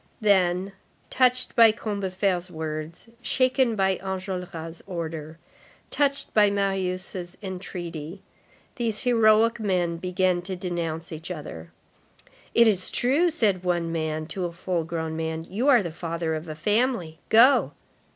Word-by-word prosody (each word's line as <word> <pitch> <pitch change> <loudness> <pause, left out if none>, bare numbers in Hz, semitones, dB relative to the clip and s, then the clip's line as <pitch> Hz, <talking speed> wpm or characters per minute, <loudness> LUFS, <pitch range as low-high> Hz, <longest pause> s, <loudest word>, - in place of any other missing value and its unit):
Then, 190 -2 +2 0.4
touched 255 0 +2
by 230 -1 +8
Combeferre's 195 -4 -2
words, 160 +2 -6
shaken 255 -1 +2
by 190 -2 +2
Enjolras' 180 -3 -5
order, 165 -3 -5 0.5
touched 280 -1 0
by 210 -1 +5
Marius' 185 -2 -2
entreaty, 180 -2 -6 0.5
these 230 -4 -2
heroic 230 -1 +4
men 180 -5 0
began 180 0 0
to 185 +1 -5
denounce 170 -2 -4
each 160 +2 -7
other.—"It 145 - -3
is 190 -4 +2
true," 285 +8 +2
said 210 - +1
one 175 -1 +1
young 165 - -4
man 155 -1 -2
to 180 +2 -3
a 175 - -3
full 170 0 -2
grown 160 -1 -3
man, 160 0 -3
"you 225 +9 -2
are 250 -7 +6
the 170 - -4
father 165 0 -3
of 155 +1 -5
a 155 - -6
family. 205 -3 0
Go." 235 +5 +5
185 Hz, 130 wpm, -25 LUFS, 165-215 Hz, 0.5 s, by